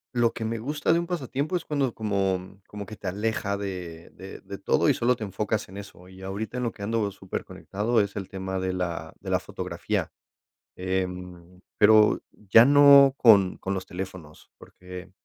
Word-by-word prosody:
lo 120 -1 +3
que 115 - -5
me 115 +1 -2
gusta 145 +6 0
de 170 - +3
un 170 - -4
pasatiempo 150 -1 -3
es - - -9
cuando 140 -5 -1
como 95 -2 -2
como 105 -1 -8
que 110 - -9
te 100 - -8
aleja 100 +1 -2
de 90 -4 -7
de - - -11
de - - -8
todo, - - +1
y - - +5
solo 125 +1 +1
te 115 - -7
enfocas 105 +1 -2
en 95 - -10
eso. 95 -3 -11
Y 95 0 -14
ahorita 100 +5 -5
en - - -2
lo 120 - -1
que 100 - -10
ando 110 0 0
superconectado 105 +3 -3
es 100 -1 -1
el 100 -3 -5
tema 95 0 -4
de 95 0 -2
la 85 -3 -4
de - - -6
la - - +2
fotografía. - - -4 0.7
Eh, 95 0 -1 0.7
pero 105 0 +5
ya 105 +2 +5
no 140 0 +7
con 100 -7 +5
con 95 - -3
los 95 -1 -4
teléfonos, 90 -4 -9
porque 90 0 -11
100 Hz, 190 wpm, -26 LUFS, 95-115 Hz, 0.7 s, no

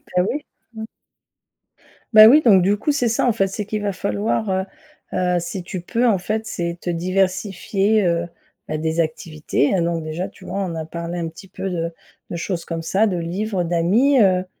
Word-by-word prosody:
Bah, 180 - +4
oui. 290 +2 -4 0.3
Mmh. 220 -1 -6 1.3
Bah 215 0 +10
oui, 290 +7 +7
donc 205 -9 +6
du 200 +3 +2
coup, 295 - 0
c'est 245 -5 +1
ça 220 - +1
en 240 - +3
fait, 195 -3 +1
c'est 200 +2 -4
qu'il 215 +1 -3
va 205 -1 -1
falloir, 115 - -1
heu, 190 0 0 0.5
heu, 180 -1 +1
si 175 +2 -5
tu 180 0 -6
peux 235 +7 0
en 215 -4 +3
fait, 215 +4 -3
c'est 170 -4 -3
te 175 - -5
diversifier, 195 +3 0
heu 170 0 0 0.4
bah 155 - -1
des 160 +2 0
activités. 155 -2 -1
Là 190 - +2
donc 170 -1 -1
déjà, 155 +4 -4
tu - - -16
vois, 200 - -4
on 185 -4 -2
a 160 -1 -4
parlé 170 +2 -5
un 165 - -2
petit 165 +4 -11
peu 195 - -5
de 170 -2 -2 0.4
de - - -5
choses 170 0 -3
comme 165 -1 -4
ça, 195 +6 +2
de 185 -4 -1
livres, 185 +3 -2
d'amis, 190 +12 +3
heu, 185 -2 +3
185 Hz, 205 wpm, -21 LUFS, 170-210 Hz, 1.3 s, Bah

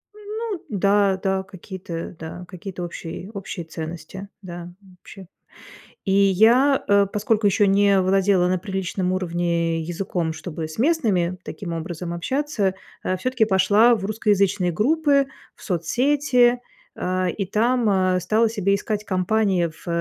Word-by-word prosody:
Ну 425 -1 -5
да, 200 -1 +2
да, 190 0 0
какие-то, 185 -3 -8
да, 165 +2 -7
какие-то 180 0 -7
общие, 175 +2 -7
общие 195 -4 -6
ценности, 165 +4 -7 0.2
да, 175 -1 -8 0.3
общие 190 -2 -12 0.8
И 195 - 0
я, 220 +8 +4
э, 200 0 +5
поскольку 210 +1 0
еще 205 +1 +4
не 200 0 +4
владела 190 -1 +3
на 185 +1 +1
приличном 190 -1 -2
уровне 170 -2 -1
языком, 170 0 -3
чтобы 160 -1 -6
с 155 - -10
местными 215 - +1
таким 180 -5 -6
образом 170 +1 -5
общаться, 220 - -1 0.3
а, 185 - -1
всё-таки 255 +3 +1
пошла 210 +4 +4
в 200 -3 -4
русскоязычные 200 -3 +1
группы, 280 - +2 0.3
в - - -17
соцсети. 245 - +2 0.4
А, 185 0 -1
и 195 +3 -3
там, 230 +4 +1
а, 185 -2 +2
стала 215 +6 +2
себе 200 -3 +1
искать 210 +1 -3
компании 190 -1 +1
в, 160 +1 -15
195 Hz, 135 wpm, -23 LUFS, 180-220 Hz, 0.8 s, э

